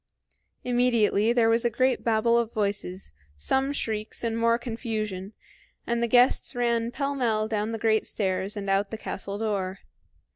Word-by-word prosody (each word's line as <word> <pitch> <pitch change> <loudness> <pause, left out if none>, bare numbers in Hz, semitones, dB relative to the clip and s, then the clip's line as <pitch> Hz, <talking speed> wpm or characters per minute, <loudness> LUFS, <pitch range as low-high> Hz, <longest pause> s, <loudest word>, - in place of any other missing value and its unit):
Immediately 235 -3 +2
there 235 -2 +3
was 230 +1 +3
a 240 - +2
great 255 +3 +1
babble 230 +1 +2
of 235 -1 +1
voices, 200 - -3 0.2
some 265 - +1
shrieks, 220 -6 -3
and 230 -1 -1
more 230 0 +3
confusion, 220 -5 -4 0.5
and 235 0 -1
the 235 - +2
guests 245 +2 +3
ran 235 -1 +1
pell 280 +3 -2
mell 225 -5 0
down 215 0 -1
the 225 - -3
great 220 0 +1
stairs 190 0 -2
and 200 -1 -4
out 195 +1 +1
the 220 - -5
castle 200 -1 -5
door. 200 -3 -2
225 Hz, 160 wpm, -26 LUFS, 205-235 Hz, 0.5 s, there